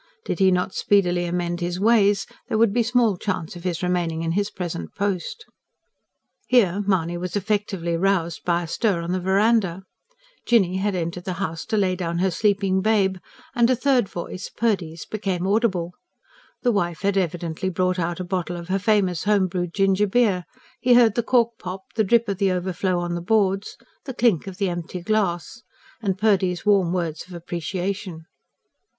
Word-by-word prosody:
Did - - -3
he 190 -1 +5
not 180 +1 0
speedily 180 -3 +2
amend 175 0 -2
his 175 +1 -2
ways, 205 -2 +3 0.2
there 220 - 0
would 225 -2 +3
be 240 - +3
small 230 -4 +2
chance 185 -4 -3
of 175 - -10
him 180 -2 0
remaining 170 -2 -1
in 165 - -1
his 200 +4 0
present 170 - -6
post. 205 - -3 1.0
Here, 205 -6 +3
Mahony 175 -3 0
was 180 +1 -4
effectually 200 -4 -1
roused 170 -2 0
by 175 0 +1
a - - -6
stir 190 0 0
on 170 - -3
the 185 - 0
verandah. 195 -1 +2 0.6
Jinny 190 -6 +3
had 200 0 -1
entered 175 0 -4
the 185 - -2
house 165 -3 -4
to 220 - 0
lay 190 -3 +2
down 170 -2 -3
her 190 +2 +1
sleeping 195 -1 +1
babe, 200 -3 +2 0.4
and 235 0 +3
a 255 - +4
third 250 -4 +2
voice, 175 +2 -6
Purdy's, 185 -8 -2
became 195 -4 -3
audible. 190 -4 +1 0.7
The 245 - +3
wife 175 -6 -1
had 200 0 +1
evidently 175 -1 -1
brought 185 0 0
out 170 0 -2
a - - -2
bottle 175 -1 -3
of 170 +1 -9
her 195 +1 +1
famous 195 -4 +1
home 205 -2 +3
brewed 175 -1 -3
gingerbeer: 195 0 +2 0.3
he 245 -1 +4
heard 235 -3 +6
the 235 - +1
cork 235 -1 +1
pop, 185 +1 -6
the 220 - +3
drip 230 +3 +3
of 200 -2 -3
the 195 -2 +2
overflow 185 0 -1
on 175 0 -2
the 175 - -3
boards, 195 0 +1 0.3
the 265 -3 -6
clink 225 -9 +2
of 190 -2 -7
the 200 -2 0
empty 175 0 -4
glass; 205 +1 -1 0.4
and 195 -4 -1
Purdy's 190 -4 +1
warm 195 -4 +3
words 170 -3 -3
of 180 - -10
appreciation. 175 +1 -4
190 Hz, 180 wpm, -23 LUFS, 175-205 Hz, 1.0 s, heard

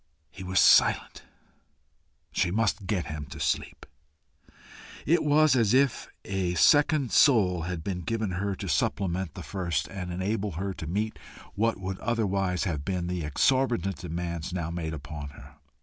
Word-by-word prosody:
He 95 - -9
was 95 0 +1
silent. - - +4 1.1
She - - +1
must 105 0 0
get 100 -5 -1
him 75 -1 -6
to 65 - -10
sleep. - - -2 1.2
It 170 +4 +3
was 150 -1 +4
as 115 -2 +3
if 135 -2 +2 0.2
a 95 -2 -1
second 145 - +4
soul 100 - +4
had 85 -3 -4
been 90 -1 -3
given 110 +2 -2
her 95 +2 -2
to - - -6
supplement 95 -3 -1
the - - -7
first, 85 -7 -2
and 95 -2 -6
enable 100 +2 -2
her 95 +4 -3
to 80 - -7
meet 100 -1 -2 0.3
what 115 0 0
would 95 0 -5
otherwise 100 -6 0
have 80 -8 -2
been 90 +1 -2
the 90 -1 -3
exorbitant 110 - +1
demands 85 -1 -4
now 85 -2 -3
made 80 -2 -4
upon 75 0 -7
her. - - -14
95 Hz, 155 wpm, -27 LUFS, 85-110 Hz, 1.2 s, silent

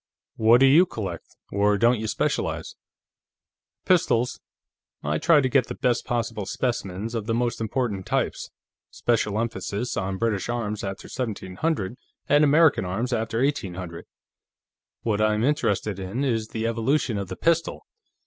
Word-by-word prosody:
"What 115 +3 +5
do - - +8
you 160 +7 +6
collect, 95 - -6 0.2
or 100 +1 +2
don't 120 +2 +3
you 110 - -3
specialize?" - - -2 1.1
"Pistols; 125 -9 +2 0.6
I 75 +1 0
try 155 -3 +5
to 130 - +1
get 130 -1 +2
the - - -5
best 125 -3 0
possible 115 -4 -2
specimens 115 -3 -2
of 110 -2 -3
the 115 - +1
most 120 -1 -1
important 110 -4 -2
types, - - -1 0.4
special 110 -3 0
emphasis 115 0 -3
on 95 0 -2
British 110 -1 -1
arms 110 -3 -2
after 95 -1 -5
1700 115 - -3 0.3
and 145 +1 +5
American 150 +1 +5
arms 110 +8 -2
after 115 +1 0
1800. 90 - -3 1.0
What 110 -2 0
I'm 110 0 +2
interested 105 -8 0
in 95 +8 -3
is 115 -5 0
the 110 0 -4
evolution 115 0 0
of 100 - -4
the - - -6
pistol. 165 0 0
115 Hz, 145 wpm, -25 LUFS, 100-125 Hz, 1.1 s, do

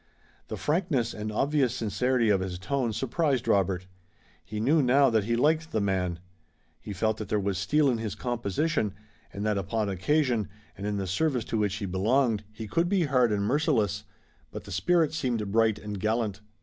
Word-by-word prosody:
The - - -5
frankness 150 -7 0
and 105 0 -4
obvious 135 +1 +1
sincerity 120 +1 +1
of 100 -2 +4
his 95 -1 -4
tone 125 +5 -1
surprised 135 +3 0
Robert. 95 -2 +1 0.6
He 105 +2 -6
knew 145 +8 +3
now 135 +1 +4
that 110 -3 +2
he 115 +1 +1
liked 155 +5 +1
the 110 - 0
man. 95 -4 0 0.6
He - - -8
felt 110 +3 0
that 110 -3 -6
there 105 - +1
was 100 -2 -1
steel 145 +10 +2
in 120 -4 +1
his 110 -4 -4
composition, 120 - -1 0.4
and 100 +1 -5
that 105 -2 +1
upon 100 +2 -1
occasion, 120 - +1 0.3
and 100 +2 -5
in 105 -1 -1
the 100 - -2
service 125 - 0
to - - +2
which 105 -2 0
he 105 - -4
belonged, 110 +4 +1
he 110 +1 -7
could 165 - +1
be 195 -3 +2
hard 125 -6 +3
and 100 -1 0
merciless, 110 - +1 0.5
but - - -8
the - - -11
spirit 170 -4 +2
seemed 120 -9 -2
bright 110 -1 +3
and 105 -1 -6
gallant. 110 -1 -1
110 Hz, 190 wpm, -27 LUFS, 100-135 Hz, 0.6 s, of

